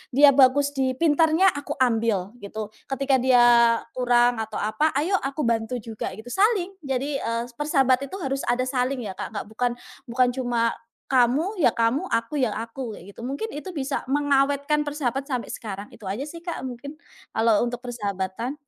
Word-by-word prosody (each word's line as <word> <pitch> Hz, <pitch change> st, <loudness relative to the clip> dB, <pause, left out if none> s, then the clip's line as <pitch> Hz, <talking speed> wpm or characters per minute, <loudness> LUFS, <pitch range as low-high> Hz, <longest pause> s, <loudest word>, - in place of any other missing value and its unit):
dia 285 Hz, 0 st, +8 dB
bagus 280 Hz, +1 st, +4 dB
di 260 Hz, -2 st, 0 dB
pintarnya, 325 Hz, +4 st, +4 dB
aku 285 Hz, 0 st, -5 dB
ambil, 225 Hz, -5 st, +1 dB
gitu. 210 Hz, +1 st, -6 dB, 0.2 s
Ketika 270 Hz, -1 st, +1 dB
dia 240 Hz, -2 st, +5 dB
kurang 245 Hz, -1 st, +3 dB
atau 220 Hz, -, -4 dB
apa, 240 Hz, +8 st, 0 dB
ayo 355 Hz, +7 st, +2 dB
aku 275 Hz, +3 st, -3 dB
bantu 230 Hz, +1 st, 0 dB
juga 220 Hz, -1 st, -5 dB
gitu, 220 Hz, +3 st, -10 dB
saling. 390 Hz, -2 st, +2 dB, 0.2 s
Jadi, 270 Hz, +2 st, -1 dB
eee, 230 Hz, +1 st, -2 dB
persahabat 275 Hz, -3 st, +2 dB
itu 380 Hz, -, -8 dB
harus 270 Hz, 0 st, -2 dB
ada 245 Hz, +1 st, +2 dB
saling, 255 Hz, -1 st, -1 dB
ya, 200 Hz, -, -4 dB
Kak. -, -, -4 dB
Nggak -, -, -3 dB
bukan 245 Hz, +2 st, 0 dB, 0.4 s
bukan 245 Hz, +1 st, +2 dB
cuma, 240 Hz, -2 st, 0 dB, 0.4 s
kamu 280 Hz, -, +2 dB
ya -, -, +3 dB
kamu, 240 Hz, +11 st, +1 dB
aku 230 Hz, +6 st, -1 dB
ya 245 Hz, -5 st, +1 dB
aku, 230 Hz, -1 st, -5 dB
kayak 195 Hz, +4 st, -12 dB
gitu. -, -, -17 dB
Mungkin 275 Hz, -, -4 dB
itu 300 Hz, +5 st, -7 dB
bisa 275 Hz, -1 st, -2 dB
mengawetkan 285 Hz, +1 st, +2 dB
persahabat 275 Hz, -1 st, -2 dB
sampai 255 Hz, -4 st, -3 dB
sekarang. 205 Hz, -2 st, -7 dB
Itu 210 Hz, -, -11 dB
aja, 205 Hz, +8 st, -3 dB
sih, 335 Hz, +3 st, -8 dB
Kak, 340 Hz, -5 st, -5 dB
mungkin 260 Hz, +4 st, -7 dB, 0.4 s
kalau 225 Hz, -2 st, +3 dB
untuk 245 Hz, +1 st, -6 dB
persahabatan. 210 Hz, +1 st, -3 dB
255 Hz, 175 wpm, -24 LUFS, 230-285 Hz, 0.4 s, dia